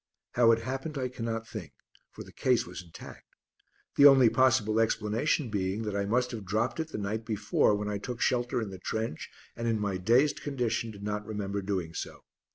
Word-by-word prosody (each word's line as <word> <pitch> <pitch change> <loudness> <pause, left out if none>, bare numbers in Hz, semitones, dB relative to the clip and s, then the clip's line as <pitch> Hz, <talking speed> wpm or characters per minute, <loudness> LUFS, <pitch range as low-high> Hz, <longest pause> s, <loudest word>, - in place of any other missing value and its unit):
How 120 -1 +5
it 115 0 +2
happened 135 +4 -4
I 130 -1 -1
cannot 115 -2 -4
think, 100 -8 -8 0.4
for - - -10
the - - -14
case 125 -2 +1
was 90 +1 -8
intact, 85 -2 -13 0.6
the 145 - +10
only 135 -5 +7
possible 120 -4 +3
explanation 115 +4 0
being 100 +1 -1
that 105 -2 -3
I 100 0 0
must 125 +4 +1
have 115 -4 -6
dropped 110 - -1
it 160 - -1
the 160 - -6
night 105 +2 -3
before 105 -1 +2
when 105 0 -3
I 105 -1 -2
took 120 +3 -6
shelter 120 0 +1
in 100 - -6
the 95 - -9
trench 110 -3 -4 0.3
and 115 - -3
in 110 -2 +1
my 100 -2 -1
dazed 120 +10 +3
condition 125 -5 -1
did 100 -2 -10
not 105 0 -2
remember 100 -2 -3
doing 95 -4 -3
so. - - -6
110 Hz, 200 wpm, -29 LUFS, 100-125 Hz, 0.6 s, the